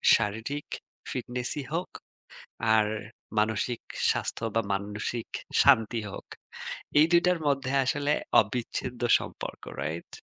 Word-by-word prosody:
শারীরিক 115 +8 -2 0.4
ফিটনেসই 125 +3 -3
হোক 175 +2 -1 0.8
আর 110 -1 +5 0.5
মানসিক 110 +2 +1 0.3
স্বাস্থ্য - - -1
বা 115 - +4
মানসিক 105 +4 -3 0.4
শান্তি 115 -4 +5
হোক। - - -8 0.7
এই 155 - +8
২ 170 0 +6
টার 180 -2 +3
মধ্যে 135 -2 +1
আসলে 145 +2 +1 0.3
অবিচ্ছেদ্য 120 +2 -4 0.2
সম্পর্ক, - - -7 0.2
রাইট? 80 +4 -4
120 Hz, 105 wpm, -28 LUFS, 110-140 Hz, 0.8 s, এই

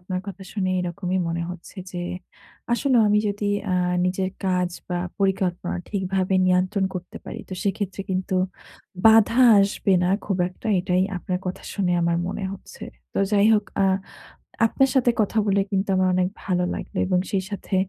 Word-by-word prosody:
আপনার 185 0 -4
কথা 195 -1 -7
শুনে 190 -3 -1
এরকমই 180 +1 -2
মনে 170 0 -2
হচ্ছে 180 -1 -10
যে 180 - -6 0.7
আসলেও 245 -1 +3
আমি 210 - +4
যদি 205 +1 -3 0.3
আ - - +1 0.3
নিজের 185 +1 0 0.2
কাজ 180 -1 +1 0.2
বা 180 - -1 0.2
পরিকল্পনা 190 -3 0
ঠিকভাবে 190 -1 -1
নিয়ন্ত্রণ 185 +2 +2
করতে 180 -1 -7
পারি। - - -7
তো - - -8
সেক্ষেত্রে 195 -1 -2
কিন্তু 185 +1 -1 0.7
বাধা 225 +1 +6 0.2
আসবে 195 0 +1
না 180 - +2 0.2
খুব 195 -3 -1
একটা। 185 - -11
এটাই 180 0 +1
আপনার 180 0 -3
কথা 180 - -4
শুনে 185 -3 +1
আমার 170 0 +2
মনে 195 +2 -4
হচ্ছে। 195 - -11 0.3
তো - - -2
যাই 205 0 +5
হোক 210 -1 +1 0.2
আ - - +4 0.8
আপনার 270 +4 +2
সাথে 250 -2 +4
কথা 215 +1 +1
বলে 200 0 +3
কিন্তু 195 0 0
আমার 185 0 +3
অনেক 180 0 +2 0.2
ভালো 180 -2 +1
লাগলো - - -7
এবং 185 -1 +2
সেই 195 -2 +1
সাথে 200 -1 -5
190 Hz, 170 wpm, -24 LUFS, 180-200 Hz, 0.8 s, বাধা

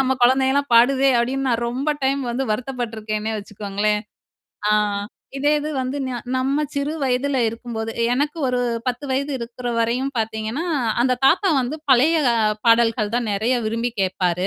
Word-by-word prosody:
நம்ம 265 0 +2
குழந்தையெல்லாம் 265 +2 +3
பாடுதே!" 265 +3 +5
அப்படின்னு 265 +3 0
நான் 235 0 0
ரொம்ப 265 +5 -1
டைம் 275 +1 +1
வந்து 255 +3 -1
வருத்தப்பட்டுருக்கேன்னே 220 -3 -3
வச்சுக்கோங்களேன். 210 +1 -2 0.7
ஆ - - +3 0.7
இதே 290 +2 +2
இது 300 +1 -4
வந்து, 255 +2 -3
ந - - -3 0.2
நம்ம 275 +3 +1
சிறு 280 +2 -1
வயதல 270 +1 0
இருக்கும்போது 225 0 -4 0.2
எனக்கு 290 +5 0
ஒரு 250 - 0 0.3
10 250 +3 -2
வயது 280 +2 -1
இருக்குற 245 +1 -6
வரையும் 250 +4 0
பாத்தீங்கன்னா, 220 +6 -2 0.4
அந்த 255 +1 +3
தாத்தா 360 +8 +4
வந்து 260 +5 -3
பழைய 285 +6 +5 0.5
பாடல்கள் 230 -2 +3
தான் 240 -1 0
நெறைய 220 +6 +1
விரும்பி 230 +2 -1
கேப்பாரு. 180 -1 0
245 Hz, 145 wpm, -21 LUFS, 225-270 Hz, 0.7 s, பாடுதே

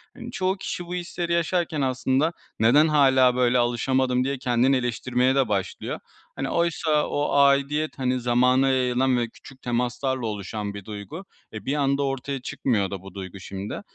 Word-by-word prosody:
Hani, - - -8
çoğu 190 +1 -1
kişi 180 -2 -5
bu 175 +1 -5
hisleri 175 -1 -3
yaşarken 170 -2 0
aslında 130 +4 +1 0.3
"Neden 140 +8 +5
hâlâ 130 -4 +4
böyle 125 0 +3
alışamadım?" 125 +1 +1
diye 140 0 -2
kendini 125 +1 +2
eleştirmeye 125 +1 0
de 135 -3 +3
başlıyor. 95 -2 -3 0.4
Hani, - - -3
oysa 160 -3 +1
o 145 0 -1
aidiyet, 140 +2 +2
hani, 130 -1 0
zamana 125 +2 +3
yayılan 130 0 +2
ve 120 -1 -1
küçük 130 +2 -16
temaslarla 125 +1 -1
oluşan 105 0 -4
bir 100 -2 -9
duygu. 110 - -8 0.3
E, 110 -1 -7
bir 140 - 0
anda 140 -1 +1
ortaya 135 0 -3
çıkmıyor 105 -7 -1
da 95 -2 -5
bu 95 -2 -12
duygu 95 0 -8
şimdi. 100 - -6
130 Hz, 165 wpm, -24 LUFS, 120-140 Hz, 0.4 s, Neden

